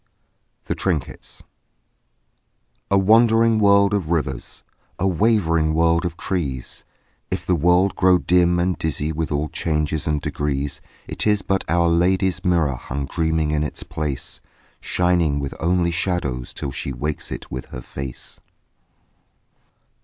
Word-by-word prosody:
THE - - -1
TRINKETS 80 -9 -4 1.5
A 100 - +4
wandering 115 +2 +4
world 100 0 +5
of 95 -6 -1
rivers, 75 -7 -2 0.3
A 95 - +1
wavering 85 -5 +2
world 85 +1 +3
of 85 -1 -4
trees, 70 -10 -3 0.5
If - - -3
the 90 - +2
world 90 +4 +3
grow 90 0 +5
dim 90 0 +3
and 90 +1 +1
dizzy 80 0 -1
With 80 0 -3
all 75 +1 0
changes 75 0 -1
and 75 -1 +1
degrees, 70 -1 -2 0.3
It - - -3
is 105 -2 +2
but 95 0 0
Our 85 +1 +3
Lady's 90 +2 +2
mirror 80 -7 +1
Hung 70 +3 -4
dreaming 80 +1 0
in 75 -1 0
its 75 - -3
place, 75 -4 -4 0.4
Shining 85 -5 +1
with 70 -1 -4
only 85 +1 +1
shadows 85 -8 -2
Till 70 - -5
she 70 - -4
wakes 75 +4 -4
it - - -7
with 65 +1 -5
her 60 - -8
face. 65 0 -7
85 Hz, 140 wpm, -22 LUFS, 75-90 Hz, 1.5 s, world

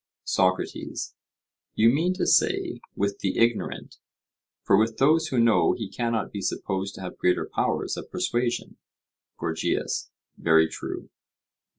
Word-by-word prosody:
SOCRATES: 95 -1 -1 0.6
You 115 +1 +5
mean 170 +7 +1
to 185 - 0
say, - - +2
with 100 0 -1
the 95 - -1
ignorant; 115 -1 0 0.6
for 100 - +4
with 110 +2 +2
those 160 +4 +4
who 130 -5 0
know 115 -1 +4
he 110 - -4
cannot 115 -3 -1
be 100 - -5
supposed 95 +1 -2
to - - -9
have 90 - -7
greater 90 - +2
powers - - -1
of - - -7
persuasion. 120 0 -1 0.6
GORGIAS: - - -2 0.3
Very 80 0 +5
true. 80 - -7
110 Hz, 130 wpm, -26 LUFS, 95-120 Hz, 0.6 s, You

